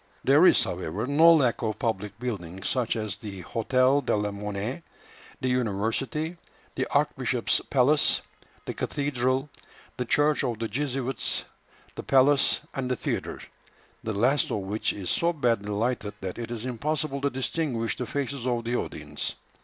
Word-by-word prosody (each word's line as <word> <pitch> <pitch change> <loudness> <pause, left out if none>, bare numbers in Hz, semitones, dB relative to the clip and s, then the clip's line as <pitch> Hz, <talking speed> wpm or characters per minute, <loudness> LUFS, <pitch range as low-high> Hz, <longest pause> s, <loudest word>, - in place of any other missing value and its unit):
There - - +6
is, - - +6
however, 100 +9 -3
no 155 +5 +6
lack 130 -9 +3
of 110 -2 -1
public 105 -2 -2
buildings, 95 -7 -4
such 125 -4 0
as 110 -3 -3
the 100 -3 -8
Hôtel 130 +7 +2
de 125 - +1
la 105 0 -1
Monnaie, 105 +8 -4 0.6
the 130 - -1
university, 125 - -1 0.4
the - - -1
archbishop's - - +1
palace, 140 +3 +3 0.4
the - - -3
cathedral, 130 -1 0 0.5
the 125 - -1
church 150 +3 +3
of 120 -2 -1
the 115 - -2
Jesuits, 135 +2 -2 0.5
the - - -6
palace, 135 +1 +4
and 130 -2 -2
the 125 - +1
theatre, - - -3 0.6
the 110 - -2
last 125 +7 +2
of 105 - -1
which 100 +3 -1
is 95 -3 -4
so 170 +1 +2
badly 115 -9 0
lighted 110 0 -1
that 95 +3 -5
it 115 - -4
is 120 0 -5
impossible 140 +3 -2
to 140 - +2
distinguish 130 -3 -1
the 125 - -4
faces 140 -2 -2
of 120 -2 0
the 120 +2 -1
audience. - - -3
125 Hz, 155 wpm, -27 LUFS, 110-140 Hz, 0.6 s, There